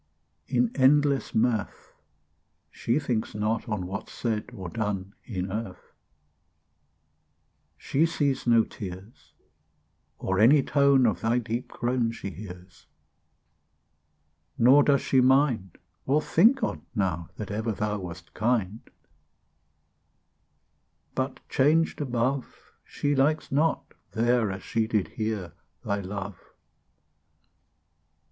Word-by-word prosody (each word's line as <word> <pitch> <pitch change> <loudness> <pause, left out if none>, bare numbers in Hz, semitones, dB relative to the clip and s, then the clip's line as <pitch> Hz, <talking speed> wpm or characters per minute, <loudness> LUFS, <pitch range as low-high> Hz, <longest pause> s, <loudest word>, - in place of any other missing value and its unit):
In 245 -2 +1
endless 140 +1 +3
mirth, 110 -2 -1 0.8
She 120 +4 -1
thinks 125 -9 -2
not 110 +3 -1
on 105 -4 -2
What's 100 +3 -6
said 110 -1 -2
or 95 -7 -7
done 100 -1 -3
In 95 -4 -4
earth: 105 -3 -6 1.8
She 155 +5 +1
sees 145 -6 -1
no 115 -1 +5
tears, 95 +2 -10 0.8
Or 95 0 -1
any 135 +6 +6
tone 140 -2 +4
Of 110 - +1
thy 115 +2 +2
deep 120 0 -3
groan 120 -1 -1
She 100 -4 -6
hears; 90 -1 -11 1.7
Nor 130 +5 +6
does 140 -2 +3
she 130 - +3
mind, 130 - +2 0.3
Or 140 +3 +3
think 225 - +3
on't - - -3
now, 90 -5 -1
That 105 -2 -6
ever 110 +2 -1
thou 105 0 -2
Wast 90 -1 -9
kind: 110 -2 0 2.3
But 130 0 -4
changed 155 +4 +2
above, 130 0 -2
She 145 0 -2
likes 145 +4 +1
not 155 +4 0 0.2
there, 120 -2 +2
As 95 0 -7
she 115 -1 -1
did 110 -4 0
here, 110 -6 -4 0.3
Thy 100 0 -1
love. 100 0 -6
115 Hz, 110 wpm, -27 LUFS, 100-135 Hz, 2.3 s, any